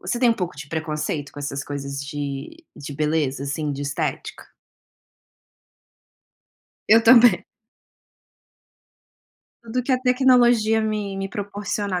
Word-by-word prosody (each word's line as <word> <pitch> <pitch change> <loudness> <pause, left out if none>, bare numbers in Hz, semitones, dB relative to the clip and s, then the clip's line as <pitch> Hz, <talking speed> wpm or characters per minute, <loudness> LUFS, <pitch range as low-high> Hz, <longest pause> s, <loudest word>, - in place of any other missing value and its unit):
você 240 - -3
tem 245 0 +4
um 230 - +4
pouco 180 -5 -4
de 145 0 -9
preconceito 155 -2 -3
com - - -11
essas 140 -1 -4
coisas, 140 -1 -5
de 145 - -6
de 145 0 -8
beleza, 150 -3 -1
assim, 145 +1 -3
de 140 - -6
estética? 145 - -4 2.4
Eu 225 +2 +7
também. 240 0 +6 2.2
Tudo 235 +2 -3
que 250 - -4
a 255 - +3
tecnologia 245 -3 +3
me 210 -2 -3
me 195 0 -4
proporcionar, 200 -1 -3
195 Hz, 120 wpm, -22 LUFS, 145-230 Hz, 2.4 s, Eu